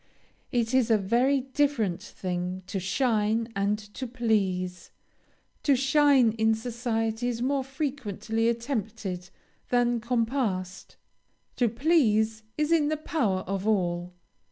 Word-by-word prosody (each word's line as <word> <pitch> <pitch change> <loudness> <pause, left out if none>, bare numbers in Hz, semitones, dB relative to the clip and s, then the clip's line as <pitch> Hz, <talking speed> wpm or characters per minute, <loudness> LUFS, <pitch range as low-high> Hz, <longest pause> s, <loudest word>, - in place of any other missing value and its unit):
It 235 0 0
is 255 -3 +3
a 220 - +5
very 245 +7 +2
different 260 - 0
thing 180 -1 -4
to 195 +1 -3
shine 220 +2 +1
and 200 +1 +1 0.2
to 260 - -5
please; 195 -7 -1 0.7
to 280 - +3
shine 270 -2 +4
in 220 0 +4
society 225 0 -2
is 240 -2 -2
more 275 +1 +1
frequently 240 -5 -2
attempted 220 -7 -3 0.4
than 240 -1 +2
compassed: 225 -6 -2 0.6
to 240 -2 +3
please 225 -5 +2 0.2
is 300 +1 0
in 315 -3 +4
the 310 +1 0
power 240 - 0
of 195 +2 -3
all. 180 -4 0
225 Hz, 120 wpm, -27 LUFS, 200-260 Hz, 0.7 s, a